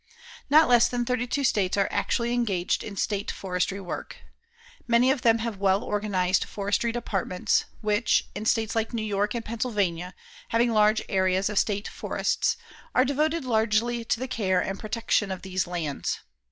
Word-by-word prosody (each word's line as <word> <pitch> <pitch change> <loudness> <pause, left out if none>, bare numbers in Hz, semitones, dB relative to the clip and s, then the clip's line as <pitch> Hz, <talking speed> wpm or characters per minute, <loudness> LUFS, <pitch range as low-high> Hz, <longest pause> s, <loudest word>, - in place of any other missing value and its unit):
Not 310 +2 +6
less 240 -1 +6
than 245 -1 -1
thirty 250 0 -1
two 280 +3 -1
states 205 -7 +1
are 200 - +3
actually 235 0 0
engaged 200 -7 0
in 205 - -7
state 205 +1 -1
forestry 185 +1 -2
work. 190 - -6 0.7
Many 240 +2 +4
of 270 -2 -1
them 230 -1 +4
have 225 -2 -4
well 195 0 +2
organized 195 -3 0
forestry 205 +3 -1
departments, 195 -6 -1 0.2
which, 210 +1 +2
in 210 +2 -5
states 225 -1 +1
like 225 +1 -1
New 220 -1 -2
York 205 +1 -1
and 230 - -4
Pennsylvania, 200 -6 -2 0.3
having 235 +1 +2
large 215 0 +3
areas 190 0 +1
of 210 - +2
state 205 -1 -1
forests, 465 -1 -1 0.4
are 255 - +5
devoted 305 +2 0
largely 230 0 +1
to 230 - 0
the 260 - -3
care 190 -7 +1
and 195 +2 -3
protection 220 -2 0
of 190 - -5
these 185 -1 -2
lands. 165 -5 -3
215 Hz, 165 wpm, -26 LUFS, 195-235 Hz, 0.7 s, Not